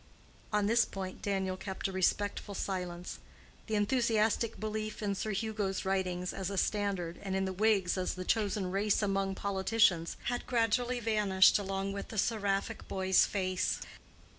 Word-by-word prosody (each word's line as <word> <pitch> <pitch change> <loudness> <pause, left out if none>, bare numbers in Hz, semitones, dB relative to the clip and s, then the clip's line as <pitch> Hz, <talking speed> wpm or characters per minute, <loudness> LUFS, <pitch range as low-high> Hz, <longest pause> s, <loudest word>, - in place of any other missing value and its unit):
On 210 -1 +2
this 230 +3 +4
point 190 -1 -6
Daniel 190 -2 -1
kept 190 +1 -4
a - - -5
respectful 200 +2 0
silence. 180 -2 -4 0.5
The 220 - -1
enthusiastic 225 0 +1
belief 215 0 -4
in 200 -1 0
Sir 205 +2 -3
Hugo's 210 -2 -2
writings 180 -2 -1
as 190 -1 -3
a 200 - -4
standard, 190 -5 -1
and 195 -1 -3
in 190 0 +1
the 190 - -2
Whigs 195 -2 +2
as 185 - -1
the 185 0 -5
chosen 205 -3 0
race 205 +2 +1
among 195 -1 0
politicians, 190 -3 +2
had 245 0 -2
gradually 245 +1 +1
vanished 210 -4 +4
along 195 0 -2
with 200 - -5
the 220 - -8
seraphic 200 -2 0
boy's 190 -1 +3
face. 185 -2 -1
200 Hz, 155 wpm, -32 LUFS, 190-215 Hz, 0.5 s, this